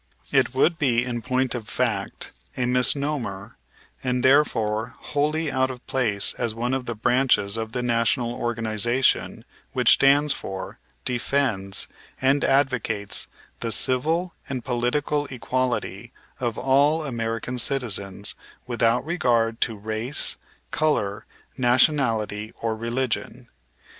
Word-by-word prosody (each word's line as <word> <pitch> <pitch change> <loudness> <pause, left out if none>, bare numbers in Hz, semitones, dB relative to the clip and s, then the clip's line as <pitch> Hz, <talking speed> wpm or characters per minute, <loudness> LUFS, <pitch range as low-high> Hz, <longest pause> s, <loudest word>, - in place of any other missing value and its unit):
It 130 - +2
would 165 +5 +3
be 125 -5 +2
in 120 -2 -3
point 130 +1 0
of 115 -4 -6
fact - - -2 0.3
a 125 - +1
misnomer 125 -5 0 0.5
and, 125 -1 0
therefore, 115 -5 +2
wholly 150 +1 -1
out 130 0 +1
of 125 -1 -8
place 115 -7 +1
as 115 -3 -1
one 120 +3 -1
of 135 -1 -2
the 120 - -4
branches 115 -3 +2
of 110 0 -4
the 125 - -2
national 120 0 +1
organization 120 +2 0 0.3
which - - +4
stands 140 +1 +5
for, 95 -1 -7 0.3
defends, 120 -6 0 0.3
and 135 +2 +2
advocates 125 -7 +1 0.3
the 115 - -3
civil 160 - +2 0.2
and 130 -3 -4
political 140 +4 0
equality 120 -3 -2 0.3
of 120 -4 -2
all 140 +5 +3
American 115 -1 -3
citizens, 105 -7 0 0.3
without 120 +1 +1
regard 120 -9 +1
to 115 - +1
race, 110 +6 0 0.4
color, 145 -10 0 0.3
nationality, 120 -4 +2
or 115 -1 -1
religion. 120 +1 -3
125 Hz, 120 wpm, -24 LUFS, 115-135 Hz, 0.5 s, stands